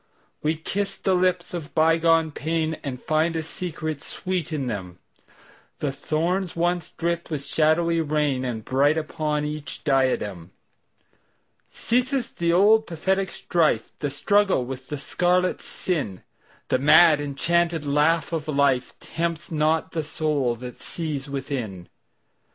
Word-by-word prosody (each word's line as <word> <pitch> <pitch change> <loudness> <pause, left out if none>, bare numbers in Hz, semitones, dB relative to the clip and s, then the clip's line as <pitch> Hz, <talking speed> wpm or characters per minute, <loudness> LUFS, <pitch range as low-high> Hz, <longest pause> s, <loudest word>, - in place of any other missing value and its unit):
We 155 +2 +1
kiss 195 +5 -3
the 190 - +1
lips 180 -1 +1
of 165 -3 -6
bygone 165 0 +4
painAnd 155 -4 -3
find 160 +2 +1
a 160 - -1
secret 155 -3 -5
sweet 180 -4 -3
in 145 -4 -2
them:The 100 +7 -8
thorns 170 +6 -1
once 175 -1 0
dripped 170 0 -2
with 145 -3 -3
shadowy 165 +3 +2
rainAre 135 -7 -1
bright 145 +4 +3
upon 150 -1 -1
each 150 -1 -6
diadem. 115 - 0 1.2
Ceases 255 +2 0
the 170 0 0
old 210 +5 +5
pathetic 190 +3 0
strife, 155 -10 0
The 145 - -1
struggle 195 0 +2
with 130 +1 -7
the 150 - -4
scarlet 180 +5 +1
sin:The 130 - -4
mad 150 +2 +6
enchanted 165 +3 0
laugh 150 +3 +2
of 160 -3 -2
lifeTempts 155 +5 -1
not 160 +1 +1
the 160 - -1
soul 150 -5 -1
that 125 +1 -9
sees 150 -4 -4
within. 125 - -4
155 Hz, 120 wpm, -24 LUFS, 140-170 Hz, 1.2 s, mad